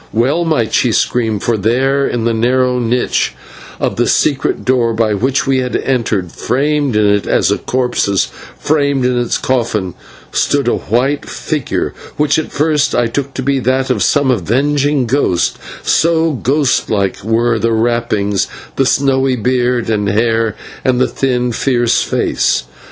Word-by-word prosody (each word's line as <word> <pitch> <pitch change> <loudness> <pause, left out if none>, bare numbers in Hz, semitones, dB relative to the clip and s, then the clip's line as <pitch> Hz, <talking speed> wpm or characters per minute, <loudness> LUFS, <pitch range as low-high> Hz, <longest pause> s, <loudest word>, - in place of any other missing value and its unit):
Well 135 +10 +1
might 150 -9 0
she 125 - +2
scream, 115 -2 0
for 115 +2 0
there 135 +6 +1
in 120 -2 -2
the 115 - +1
narrow 125 +2 +1
niche 120 +1 0 0.4
of - - -2
the - - +1
secret 140 -3 0
door 120 -3 +1
by 110 -1 +1
which 130 +7 0
we 135 -1 +1
had 125 -1 -2
entered, 110 -9 -1
framed 145 -1 0
in 105 0 +3
it 100 0 +1
as - - +2
a - - 0
corpse 125 -3 -1
is 100 -2 +1 0.3
framed 140 -3 +1
in 125 0 +1
its 120 -1 0
coffin, 110 -8 -1 0.4
stood - - 0
a - - +2
white 130 +7 -1
figure 150 -5 -3 0.2
which 150 0 +2
at 155 - -5
first 150 -2 +1
I 120 - +2
took 135 +4 -3
to 130 - -3
be 135 0 +1
that 130 +1 0
of 110 -5 0
some 145 -3 +2
avenging 135 - +1
ghost, 110 -9 0 0.2
so 165 0 +2
ghostlike 120 -7 0
were 115 +1 +1
the 115 +1 0
wrappings, 110 -3 0 0.3
the 135 - +2
snowy 135 -1 +2
beard 125 0 0
and 105 -2 0
hair, 115 +1 +1 0.3
and 125 -1 +1
the 130 - +3
thin, 125 -2 -1
fierce 120 0 +1
face. 65 - 0
125 Hz, 160 wpm, -15 LUFS, 115-135 Hz, 0.4 s, in